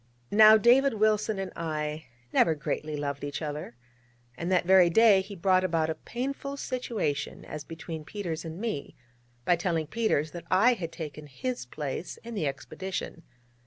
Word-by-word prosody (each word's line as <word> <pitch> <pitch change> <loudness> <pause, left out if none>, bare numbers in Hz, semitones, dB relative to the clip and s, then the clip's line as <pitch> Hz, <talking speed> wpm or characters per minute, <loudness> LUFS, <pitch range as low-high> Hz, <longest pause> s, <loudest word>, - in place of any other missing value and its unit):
Now, 215 +1 +8
David 245 +4 +5
Wilson 215 0 +2
and 195 -1 -4
I 155 -1 -3 0.3
never 160 - +4
greatly 150 +1 -3
loved 140 -1 -3
each 145 0 -3
other, 150 -5 -5 0.6
and 170 +2 -3
that 180 -2 +3
very 185 -1 +6
day 210 +1 +6
he 200 +1 -9
brought 185 +1 +3
about 165 -3 +1
a - - 0
painful 275 - -5
situation 235 - -3
as 150 -1 -6
between 165 0 -7
Peters 165 0 -5
and 165 +2 -7
me, 215 -10 -4 0.5
by 175 - +4
telling 170 -2 -1
Peters 160 -7 0
that 175 - -8
I 215 +7 +5
had 170 -7 -5
taken 150 -2 -7
his 240 - -4
place 145 +5 -5
in 235 0 -7
the 170 -9 -1
expedition. 165 +5 -5
175 Hz, 165 wpm, -28 LUFS, 155-215 Hz, 0.6 s, Now